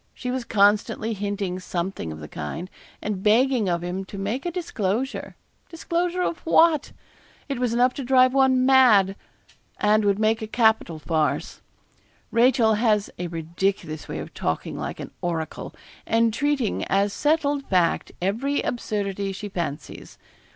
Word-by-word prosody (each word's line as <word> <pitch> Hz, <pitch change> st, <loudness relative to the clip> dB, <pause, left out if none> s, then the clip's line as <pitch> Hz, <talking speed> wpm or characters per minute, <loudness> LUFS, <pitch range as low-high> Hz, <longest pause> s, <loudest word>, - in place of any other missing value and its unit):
She 250 Hz, -, -4 dB
was 255 Hz, -1 st, -3 dB
constantly 210 Hz, +2 st, +2 dB
hinting 200 Hz, -2 st, -3 dB
something 175 Hz, -, -4 dB
of 75 Hz, -, -8 dB
the 75 Hz, -, -8 dB
kind; 165 Hz, -, -6 dB, 0.3 s
and 205 Hz, -3 st, -3 dB
begging 230 Hz, 0 st, +3 dB
of 170 Hz, 0 st, -1 dB
him 180 Hz, +2 st, -3 dB
to 200 Hz, -, -9 dB
make 215 Hz, -, -3 dB
a -, -, -2 dB
disclosure 260 Hz, -, -3 dB, 0.3 s
disclosure 345 Hz, +2 st, -1 dB
of 335 Hz, -, -2 dB
what? 325 Hz, -2 st, +3 dB, 0.6 s
It 275 Hz, -3 st, -3 dB
was 250 Hz, -2 st, 0 dB
enough 245 Hz, +2 st, +3 dB
to 275 Hz, -, -5 dB
drive 255 Hz, 0 st, +4 dB
one 260 Hz, -1 st, +4 dB
mad, 230 Hz, -8 st, +5 dB, 0.6 s
and 210 Hz, +1 st, +3 dB
would 200 Hz, -1 st, +2 dB
make 220 Hz, +1 st, +1 dB
a 220 Hz, -, -4 dB
capital 220 Hz, -7 st, +2 dB
farce. 155 Hz, 0 st, -1 dB, 0.7 s
Rachel 230 Hz, -1 st, +4 dB
has 210 Hz, -2 st, +1 dB
a 180 Hz, -, -2 dB
ridiculous 165 Hz, -1 st, -3 dB
way -, -, -5 dB
of -, -, -7 dB
talking 80 Hz, -, -3 dB
like -, -, -5 dB
an -, -, -7 dB
oracle, 165 Hz, -2 st, -4 dB, 0.3 s
and 225 Hz, 0 st, +2 dB
treating 285 Hz, -3 st, 0 dB
as 200 Hz, +1 st, +1 dB
settled 290 Hz, -2 st, 0 dB
fact 180 Hz, -3 st, +1 dB
every 250 Hz, +10 st, 0 dB
absurdity 200 Hz, -4 st, -2 dB
she 205 Hz, +2 st, -6 dB
fancies. 170 Hz, -6 st, -6 dB
215 Hz, 150 wpm, -24 LUFS, 190-255 Hz, 0.7 s, mad